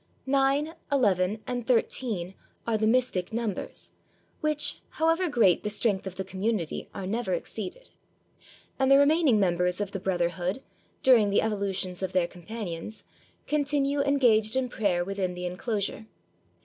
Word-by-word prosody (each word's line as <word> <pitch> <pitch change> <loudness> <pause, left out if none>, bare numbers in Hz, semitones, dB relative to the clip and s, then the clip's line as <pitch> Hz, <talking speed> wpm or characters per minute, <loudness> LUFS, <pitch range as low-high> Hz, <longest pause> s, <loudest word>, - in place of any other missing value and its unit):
Nine, 275 +3 +2 0.2
eleven, 210 -5 +2
and 245 -2 -4
thirteen 225 -6 0 0.3
are 230 - 0
the 215 0 +1
mystic 230 -6 +1
numbers, 220 -4 -2 0.5
which, 305 -1 +1
however 330 +3 +1
great 225 - +4
the 210 - -2
strength 205 -2 0
of 185 - -6
the 190 - -3
community, 195 -3 -3
are 190 - -6
never 235 - -1
ex - - -6
ceeded; - - -6 0.9
and 265 0 +3
the 275 - +8
remaining 285 -4 +4
members 180 -1 +1
of 205 -2 -2
the 195 - -4
brotherhood, 180 +4 -1 0.4
during 235 -6 +6
the 200 - +2
evolutions 195 -4 -2
of 190 -1 -3
their 185 -2 +3
companions, 180 +1 -7 0.4
continue 285 -1 +1
en 280 0 +2
gaged 220 -3 +3
in 260 -1 0
prayer 185 -7 0
within 190 -2 -2
the 180 0 -5
inclosure. 200 +3 -2
215 Hz, 150 wpm, -27 LUFS, 185-265 Hz, 0.9 s, the